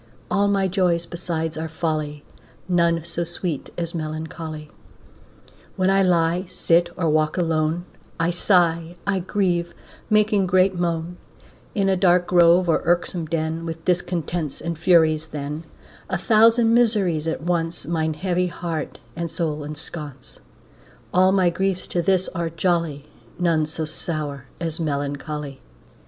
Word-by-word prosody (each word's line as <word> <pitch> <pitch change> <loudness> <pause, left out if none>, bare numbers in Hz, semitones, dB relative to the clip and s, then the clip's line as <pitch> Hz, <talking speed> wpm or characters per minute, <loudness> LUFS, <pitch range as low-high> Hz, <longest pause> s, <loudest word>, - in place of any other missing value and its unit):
All 200 0 +3
my 195 -1 +2
joys 180 -3 +1
besides 165 -2 -3
are 160 0 -4
folly, 155 -2 -3 0.4
None 170 -2 +2
so 170 0 -2
sweet 170 -3 -4
as 170 -1 -3
melancholy. 155 -1 -5 1.0
When 190 0 +2
I 195 0 +4
lie, 175 0 +2
sit, 175 -1 +2
or 175 -3 0
walk 155 +1 +1
alone, 165 0 0 0.3
I 165 +1 +2
sigh, 170 -2 +2
I 200 -1 +1
grieve, 175 -2 -1 0.3
making 210 -2 +3
great 185 +1 +4
moan, 170 -1 -2 0.6
In 200 -3 +2
a 190 - +3
dark 180 -1 +4
grove, 175 0 +5
or 165 - +2
irksome 175 -1 0
den, 160 +1 -2
With 165 -1 -6
discontents 175 -3 -1
and 170 0 -3
Furies 160 -2 +3
then, 150 +2 -5 0.4
A 185 - 0
thousand 225 +4 +4
miseries 200 -10 +2
at 160 - -2
once 170 -2 -1
Mine 160 -1 -1
heavy 180 +2 0
heart 170 -3 -4 0.2
and 170 0 -3
soul 155 -3 -2
ensconce, 150 -2 -8 0.7
All 185 +1 +5
my 185 -3 +3
griefs 190 +1 -1
to 175 - 0
this 185 +1 +2
are 170 -2 -3
jolly, 165 -4 -1 0.3
None 165 -3 +2
so 160 +1 -3
sour 150 -3 -3
as 165 0 -3
melancholy. 145 -1 -3
170 Hz, 140 wpm, -23 LUFS, 160-180 Hz, 1.0 s, grove